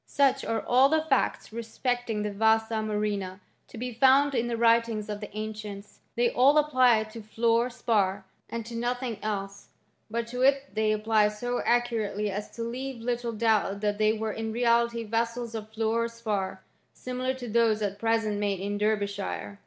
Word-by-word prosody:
Such 275 -2 +2
are 225 -1 -1
all 255 +3 +5
the 315 +1 +2
facts 270 -6 0
respecting 235 -1 -2
the 210 - -2
vasa 220 +2 +2
murrhinft 210 -3 -2 0.3
to - - -11
be 250 +1 -4
found 270 +4 +5
in 240 -2 0
the 235 -1 -2
writings 230 -2 +2
of 210 -1 -4
the 210 - -6
ancients; 210 -2 -7 0.2
they 240 0 +2
all 275 +4 +5
apply 255 -7 +4
to 220 +1 -10
fluor 230 +3 +1
spar, 200 -5 0 0.2
and 230 -1 -4
to 235 - -9
nothing 240 -1 -2
else; 200 -2 -4 0.4
but 230 +1 -2
to 250 +1 -4
it 275 +1 +2
they 215 0 +1
apply 215 0 +3
so 245 +4 -3
accurately 225 -4 0
as 205 +2 -5
to 230 - -4
leave 255 +2 -5
little 240 0 -2
doubt 215 -3 +1
that 205 0 -1
they 215 0 +4
were 220 -1 -3
in 225 0 -4
reality 235 0 +2
vessels 230 +1 -2
of 215 -1 -6
fluor 225 +1 0
spar, 205 -5 -3 0.3
similar 255 +1 -3
to 250 -2 -7
those 220 -1 +2
at 200 0 -3
present 225 -2 0
made 200 -2 -1
in 205 +1 -3
Derbyshire. 205 -1 -2
225 Hz, 175 wpm, -27 LUFS, 210-240 Hz, 0.4 s, all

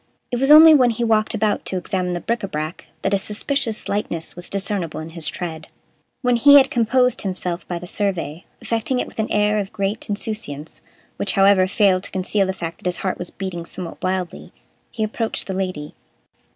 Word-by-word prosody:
It 245 - -1
was 270 +2 +2
only 315 +1 +10
when 255 -5 +5
he 235 +1 -2
walked 220 0 +2
about 215 -1 0
to 190 - -2
examine 180 0 -2
the 175 - -2
bric 235 +6 -1
Ã 195 - -5
brac 155 +2 -5 0.2
that 195 - +1
a 200 - +3
suspicious 220 +3 -2
lightness 170 -5 -2
was 175 0 -6
discernible 195 -5 -2
in 160 +1 -7
his 165 -1 -1
tread. 160 -3 -5 0.6
When 250 -1 +3
he 285 +4 +7
had 275 -1 +7
composed 250 +2 +2
himself 180 -2 -4
by 175 - -3
the 175 - -8
survey, 175 -5 -2 0.2
effecting 230 +3 -1
it - - -1
with - - -12
an 220 - 0
air 210 0 +2
of 200 -1 -4
great 200 +3 -3
insouciance, 200 -8 -4 0.4
which, 200 - -1
however, 195 -2 +5
failed 195 -2 +3
to - - -8
conceal 190 +1 0
the - - 0
fact 170 -3 -6
that - - -5
his 180 - 0
heart 185 - -1
was 175 - -4
beating 185 -3 -5
somewhat 170 0 -7
wildly, 185 -1 -3 0.4
he 220 - -3
approached 220 +1 -2
the 190 - -4
Lady. 185 -6 -4
195 Hz, 205 wpm, -21 LUFS, 180-220 Hz, 0.6 s, only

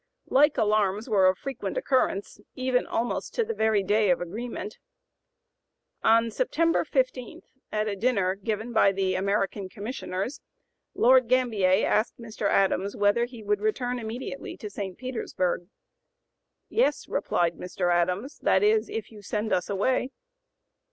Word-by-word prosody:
Like 295 +3 +5
alarms 210 0 +1
were 200 -5 +4
of 185 0 +3
frequent 270 - -5
occurrence, 255 - 0 0.2
even 255 -1 0
almost 235 +1 -2
to 470 - +2
the 455 - -3
very 220 - +2
day 210 +1 +2
of 175 - +3
agreement. 210 +3 -6 1.2
On 230 +1 +4
September 335 - +1
15, 255 -4 -2 0.3
at 215 0 0
a 205 - -2
dinner 200 -4 +1
given 215 +4 -4
by 200 -3 +4
the 190 -1 0
American 195 0 -1
Commissioners, 205 +2 -5 0.5
Lord 255 0 +5
Gambier 220 -6 +3
asked 215 +2 +1
Mr. 220 -3 -3
Adams 195 0 +1
whether 205 +4 +3
he 240 -3 -11
would 205 0 0
return 245 +3 -1
immediately 240 +4 -6
to 210 -5 -7
St. 195 -2 -5
Petersburg. 185 -9 -2 1.0
"Yes," - - +1
replied 170 -1 0
Mr. 180 -1 -1
Adams, 180 - -1
"that 190 - +3
is, 215 +1 +3
if 225 -1 -5
you 210 -2 -12
send 210 +1 -2
us 180 - 0
away." 250 +6 +1
215 Hz, 140 wpm, -27 LUFS, 195-245 Hz, 1.2 s, Like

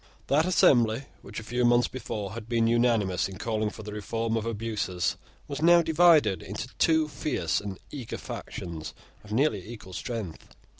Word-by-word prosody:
That 155 +5 +2
assembly, 120 -8 +4 0.2
which 105 - -7
a - - -9
few 120 +3 -1
months 120 0 +4
before 105 -6 -5
had 115 0 -8
been 115 -1 +2
unanimous 115 -6 +2
in 95 - -9
calling 110 -1 -1
for 110 - -10
the 105 0 -7
reform 115 +2 -2
of 115 0 -2
abuses, 110 -5 -1 0.3
was 145 0 -5
now 170 +1 +6
divided 160 - +5
into 105 +7 -5
two 160 -1 +4
fierce 135 - -1
and 100 -2 -6
eager 130 -6 -6
factions 80 -3 -7 0.3
of 105 - -13
nearly 140 +8 +1
equal 100 -5 -10
strength. 105 -4 -6
115 Hz, 165 wpm, -28 LUFS, 105-130 Hz, 0.3 s, now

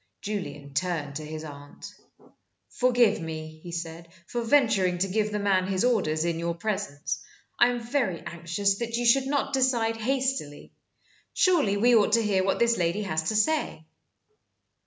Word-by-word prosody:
Julian 150 -9 -5
turned 145 -2 -2
to 155 - -7
his 155 +1 -7
aunt. 145 -2 -10 0.8
"Forgive 245 -5 +3
me," 155 -1 -7
he 175 - -9
said, 170 0 -6 0.2
"for 240 +6 -3
venturing 225 -8 +3
to 190 +2 0
give 210 +2 0
the 210 - -1
man 195 -2 +1
his 190 +2 0
orders 170 -10 +1
in 170 -1 -1
your 170 0 -2
presence. 195 -7 -3 0.4
I - - +7
am 245 0 -1
very 235 - -1
anxious 175 +4 -1
that 235 -1 -2
you 240 - -1
should 265 +3 +4
not 280 0 -1
decide 240 -4 +1
hastily. 255 - -2 0.6
Surely 325 - +3
we 240 +4 +4
ought 215 -2 +4
to 230 0 +4
hear 195 -3 +1
what 195 - +1
this 235 -2 +2
lady 175 +5 0
has 160 -5 -1
to 215 - -1
say?" 215 - 0
200 Hz, 165 wpm, -26 LUFS, 165-235 Hz, 0.8 s, I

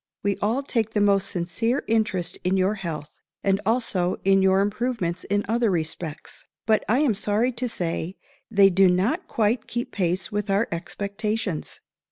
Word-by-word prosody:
_ - - -58
We 200 -1 +1
all 230 +7 0
take 225 -5 -1
the - - +3
most 200 -1 +3
sincere 195 +8 -1
interest 215 -6 0
in 185 +1 +1
your 190 +2 +2
health, 165 -7 -6 0.2
and 195 0 +2
also 210 -6 +1
in 195 0 +4
your 190 0 +4
improvements 205 -4 -1
in 205 +1 0
other 230 +1 +2
respects. 160 -2 -4 0.2
But 220 -1 +3
I 245 +6 +3
am 280 -7 +3
sorry 215 +4 +1
to 250 0 -3
say 175 -2 -3 0.3
they 200 -3 +5
do 190 +1 +5
not 200 - +1
quite 220 +1 0
keep 240 0 -3
pace 185 -1 -1
with 210 0 -2
our 200 +3 +2
expectations. 200 +2 -3
200 Hz, 170 wpm, -24 LUFS, 185-225 Hz, 0.3 s, they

